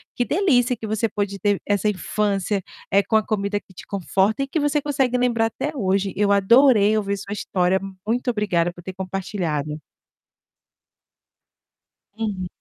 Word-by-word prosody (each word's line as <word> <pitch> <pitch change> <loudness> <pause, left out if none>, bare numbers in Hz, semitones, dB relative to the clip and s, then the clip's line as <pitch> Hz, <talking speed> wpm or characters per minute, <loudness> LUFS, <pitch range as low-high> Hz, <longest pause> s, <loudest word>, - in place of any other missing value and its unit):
que 245 - 0
delícia 260 -9 +2
que 225 - -7
você 220 +1 0
pode 200 -1 -3
ter 205 +1 0
essa 205 0 0
infância, 200 +1 -1 0.3
eh, 200 0 +4
com 220 - -1
a 215 - +1
comida 205 -1 -1
que 190 - -23
te - - -11
conforta 200 +4 0
e 275 - -1
que 310 +4 -1
você 290 0 +1
consegue 270 -4 0
lembrar 240 -2 +2
até 285 +6 -4
hoje, 195 -4 0
eu 200 +1 +2
adorei 215 +1 +5
ouvir 200 -1 -1
sua 200 +1 -6
história, 185 -2 0 0.3
muito 245 +2 0
obrigada 205 -6 +1
por 175 - -13
ter 190 +2 -7
compartilhado. 180 -6 -3 2.4
Uhum. 200 -5 -3
205 Hz, 155 wpm, -22 LUFS, 195-235 Hz, 2.4 s, adorei